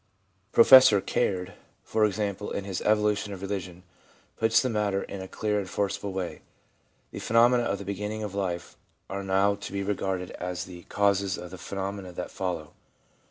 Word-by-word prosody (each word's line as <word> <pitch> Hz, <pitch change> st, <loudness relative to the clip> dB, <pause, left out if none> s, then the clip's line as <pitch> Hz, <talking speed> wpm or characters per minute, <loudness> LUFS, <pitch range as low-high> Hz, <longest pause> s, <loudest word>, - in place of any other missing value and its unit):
Professor 125 Hz, -3 st, +8 dB
Caird, 95 Hz, -2 st, -1 dB, 0.3 s
for 110 Hz, -1 st, +2 dB
example, 105 Hz, -1 st, -2 dB
in 100 Hz, -, -3 dB
his 95 Hz, -2 st, -4 dB
Evolution 105 Hz, -1 st, +1 dB
of 95 Hz, 0 st, -8 dB
Religion, 90 Hz, -3 st, -5 dB, 0.5 s
puts 110 Hz, 0 st, +3 dB
the 130 Hz, -, +1 dB
matter 105 Hz, -4 st, 0 dB
in 100 Hz, -, -7 dB
a 95 Hz, -, -6 dB
clear 105 Hz, +1 st, -1 dB
and 95 Hz, -2 st, -5 dB
forcible 100 Hz, 0 st, -2 dB
way: 95 Hz, -2 st, -4 dB, 0.3 s
* -, -, -41 dB
The -, -, -6 dB
phenomena 120 Hz, +2 st, +4 dB
of 100 Hz, -, -1 dB
the 100 Hz, -, -8 dB
beginning 105 Hz, +2 st, -4 dB
of 105 Hz, -2 st, -5 dB
life 90 Hz, -3 st, -3 dB, 0.4 s
are 100 Hz, 0 st, -3 dB
not 100 Hz, +1 st, +2 dB
to -, -, -6 dB
be 100 Hz, 0 st, -1 dB
regarded 95 Hz, -2 st, -2 dB
as 90 Hz, 0 st, -4 dB
the 90 Hz, -2 st, -11 dB
causes 100 Hz, -1 st, +1 dB
of 90 Hz, -, -8 dB
the 95 Hz, -, -9 dB
phenomena 100 Hz, -1 st, -5 dB
that -, -, -5 dB
follow. 85 Hz, -5 st, -4 dB
100 Hz, 175 wpm, -27 LUFS, 95-105 Hz, 0.5 s, Professor